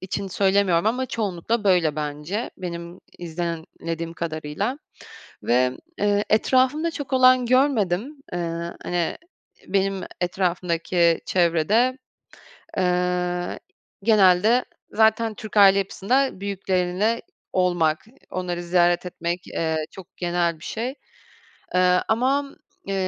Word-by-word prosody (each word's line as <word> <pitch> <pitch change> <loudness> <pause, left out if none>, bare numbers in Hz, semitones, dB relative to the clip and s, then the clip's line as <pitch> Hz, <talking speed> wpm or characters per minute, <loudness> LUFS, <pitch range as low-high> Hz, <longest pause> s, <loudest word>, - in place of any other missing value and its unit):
için 195 +1 -4
söylemiyorum 190 -1 +2
ama 250 +4 +1
çoğunlukla 215 0 -2
böyle 175 -6 +3
bence. 150 +8 -3
Benim 170 0 -7 0.2
izlemlediğim 165 -1 -5
kadarıyla 165 - -3 0.7
ve, 125 +1 +3 0.3
eee, 205 0 +2
etrafımda 260 +8 +2
çok 285 -4 -6
olan 255 -1 +5
görmedim. 255 -1 +1 0.2
Eee, 175 - -2 0.4
hani, 175 -1 -1 0.5
benim 195 0 0 0.2
etrafımdaki 175 -1 +1
çevrede, 185 +9 +2 0.8
eee, 180 -1 0 0.4
genelde 215 +2 +4 0.3
zaten 220 0 +3
Türk 215 0 -7
aile 195 -1 +7
yapısında 210 +6 0
büyükleriyle 195 +2 0 0.3
olmak, 175 -2 +1 0.3
onları 175 -1 -3
ziyaret 175 0 +2
etmek, 175 0 -4
eee, 160 -1 -1 0.2
çok 190 -2 -13
genel 175 -2 0
bir - - -14
şey. 245 +4 -3 0.8
Eee, 180 0 +4
ama, 270 +5 +1 0.3
eee, 195 - -2
185 Hz, 100 wpm, -23 LUFS, 175-220 Hz, 0.8 s, aile